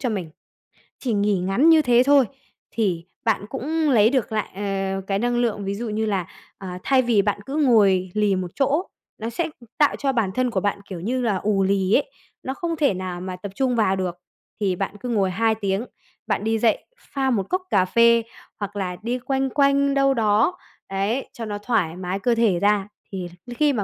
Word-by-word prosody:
cho 255 - -1
mình, 185 -7 -3 0.7
chỉ 245 -4 -1
nghỉ 205 -1 +2
ngắn 195 - +3
như 320 -1 +7
thế 245 -2 +4
thôi, 280 -2 +5 0.5
thì 180 -7 -1 0.2
bạn 210 -3 +1
cũng 305 +4 -1
lấy 220 -3 +5
được 255 -4 0
lại, 215 -1 -1 0.5
ờ, 195 - -3
cái 195 0 0
năng 240 +2 0
lượng. 220 -4 0
Ví 195 - -2
dụ 230 +2 -4
như 220 +1 -1
là, 190 -4 -1 0.3
ờ, 190 - -8 0.2
thay 265 -1 +4
vì 235 -5 +3
bạn 205 0 -1
cứ 275 +2 -5
ngồi 200 -10 +4
lì 210 -2 +2
một 180 -1 -3
chỗ, 285 +5 +1 0.3
nó 225 +1 -4
sẽ 320 +8 -2 0.3
tạo 295 -2 +4
cho 275 -1 0
bản 220 -7 0
thân 255 -1 +1
của 190 - 0
bạn, 205 0 -1
kiểu 180 -3 -5
như 250 +8 -1
là, 215 -5 +1
ù 200 0 +1
lì 195 +1 +1
ấy, - - +2 0.3
nó 265 - -3
không 335 +2 -3
thể 290 -9 +2
nào 180 -1 -5
mà 185 0 -5
tập 190 +2 -8
trung 260 -2 +1
vào 195 -4 +2
được. 180 -2 -3 0.4
Thì 195 -3 +1
bạn 195 +2 -3
cứ 250 - -5
ngồi 195 -5 +1
2 220 +3 +1
tiếng, 200 +2 -1 0.4
bạn 200 - 0
đi 225 0 0
dậy 225 -2 +2
pha 270 - -2
một 200 -6 0
cốc 370 0 0
cà 185 -2 +3
phê 235 +3 +4 0.4
hoặc 205 0 -5
là 185 -3 -3
đi 245 +2 -1
quanh 270 +1 -1
quanh 280 0 +3
đâu 275 -1 +3
đó, 225 - +2 0.3
đấy, 200 +7 -1
cho 230 - -6
nó 205 -1 -4
thoải 205 -7 0
mái 185 +1 -3
cơ 235 +3 +1
thể 215 -7 +2
ra, 205 0 +2 0.2
thì 185 -2 -4 0.2
đến 240 -1 -8
khi 295 0 +3
mà 210 -4 -1
220 Hz, 220 wpm, -23 LUFS, 195-255 Hz, 0.7 s, như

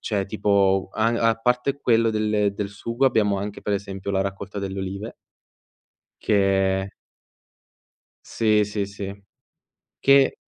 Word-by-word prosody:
cioè 100 -3 -2
tipo 100 -2 +1
a 110 +1 +1 0.2
a - - +1
parte 125 +4 0
quello 115 -1 +3
del 105 -2 0
del 105 -1 -3
sugo, 115 +5 -3
abbiamo 105 -6 +3
anche, 100 +1 -5
per 105 - -1
esempio, 100 0 -4
la 95 - +1
raccolta 100 +1 -4
delle 95 0 -4
olive 100 +4 -5 1.1
che 95 -1 +1 1.3
Sì, 110 -2 +2
sì, 105 0 -2
sì, 100 0 -8 0.8
che 140 0 +4
100 Hz, 125 wpm, -23 LUFS, 100-110 Hz, 1.3 s, che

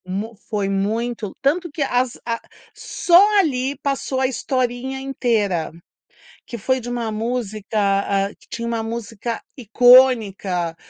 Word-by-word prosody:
Mu 200 +5 -5
foi 205 -3 -1
muito, 210 +2 -2
tanto 340 +6 +1
que 290 0 -2
as 250 -2 0
a 230 -1 -2 0.3
só 400 +4 +4
ali 275 -5 0
passou 275 -1 -1
a 265 - +2
historinha 255 +1 -2
inteira, 225 -10 -1 0.7
que 235 - -7
foi 260 +4 0
de 240 - -6
uma 240 -2 -2
música, 220 -1 -3
ah, 195 0 +1
que - - -23
tinha 235 0 -4
uma 230 -1 -2
música 230 0 -5
icônica, 220 - +4
235 Hz, 130 wpm, -21 LUFS, 210-260 Hz, 0.7 s, só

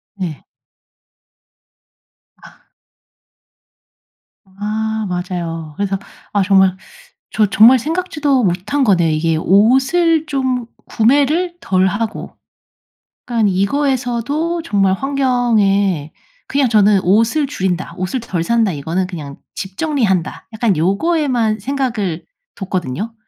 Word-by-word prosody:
네. 175 -7 -5 2.0
아. - - -18 1.8
아 215 +2 -3
맞아요. 170 -4 -4
그래서 195 -1 -1 0.3
아 205 - +2
정말 190 -1 +3 0.6
저 215 -1 +3
정말 225 +6 +6
생각지도 300 - 0
못한 195 +10 0
거네요. 175 -6 +3
이게 160 +1 0
옷을 270 - +3
좀 260 -4 -1 0.2
구매를 290 +9 +1
덜 185 0 +1
하고. 215 +3 -3 0.9
약간 230 -3 +2
이거에서도 270 - -1
정말 195 - +1
환경에 215 - +1 0.4
그냥 275 -1 +1
저는 210 -3 +4
'옷을 230 - +2
줄인다. 190 -9 -3
옷을 185 +8 -2
덜 175 -7 -3
산다.' 230 -1 +1
이거는 165 +5 -2
그냥 150 -6 -8 0.2
'집 190 -1 -7
정리한다.' 230 - -1
약간 220 -3 +1
요거에만 225 - +1
생각을 230 - -2 0.3
뒀거든요. 190 - -4
215 Hz, 215 characters per minute, -17 LUFS, 185-265 Hz, 2.0 s, 정말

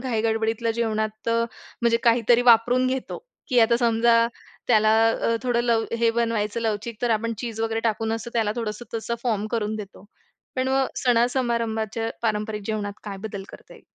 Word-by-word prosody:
घाई 240 -4 -1
गडबडीतल्या 225 +1 0
जेवणात 220 0 -2
म्हणजे 230 0 -1
काहीतरी 235 +1 +4
वापरून 245 +3 +2
घेतो 260 0 -3 0.3
की 250 - +2
आता 235 +1 +4
समजा 230 0 +4 0.5
त्याला 215 -2 +4 0.2
अ, 230 0 0
थोडं 245 -1 +1
लव 230 -2 +2
हे 230 -1 +3
बनवायचं 225 -1 -1
लवचिक 220 0 -3
तर 240 - +1
आपण 230 +1 0
चीज 225 -2 -5
वगैरे 225 0 -1
टाकून 220 +1 -2
अस 225 +1 -4
त्याला 220 -3 +1
थोडंसं 225 0 -4
तसं 230 +1 -2
फॉर्म 215 -4 0
करून 215 0 -2
देतो 205 -2 -9 0.5
पण 260 0 0
मग 265 0 +2
सणासमारंभाच्या 230 -3 0
पारंपरिक 210 -1 -1
जेवणात 210 -2 -2
काय 200 -2 -5
बदल 200 -2 -6
करता - - -14
येईल? - - -18
225 Hz, 165 wpm, -24 LUFS, 220-235 Hz, 0.5 s, काहीतरी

